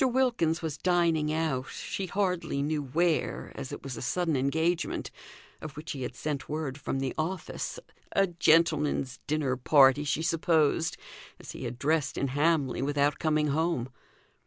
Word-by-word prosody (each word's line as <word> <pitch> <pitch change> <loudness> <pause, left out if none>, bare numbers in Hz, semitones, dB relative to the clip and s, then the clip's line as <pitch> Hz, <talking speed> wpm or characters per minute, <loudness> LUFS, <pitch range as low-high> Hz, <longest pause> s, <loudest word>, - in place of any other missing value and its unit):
Wilkins 240 -11 +1
was 155 -2 -3
dining 170 -4 +2
out, 155 -5 -1
she 195 - -4
hardly 180 -7 -1
knew 150 +1 0
where, 160 +4 0
as 130 - -7
it - - -7
was 135 -2 -5
a 115 - -7
sudden 165 +4 0
engagement, 160 +6 0 0.5
of 150 -2 -8
which 155 +2 -6
he 135 - -5
had 125 0 -4
sent 145 -2 -4
word 150 -2 -3
from 140 - -2
the 135 -1 -2
office 180 - -3 0.3
a 195 - +4
gentleman's 160 -6 +2
dinner 145 -4 0
party, 135 +2 +5
she 150 +2 -1
supposed, 165 -1 +2 0.4
as - - -9
he - - -7
had 120 0 -5
dressed 150 +1 0
in 140 - 0
Hamley 145 -2 +1
without 145 +1 +1
coming 155 -2 +1
home. 150 -4 0
155 Hz, 160 wpm, -29 LUFS, 140-165 Hz, 0.5 s, party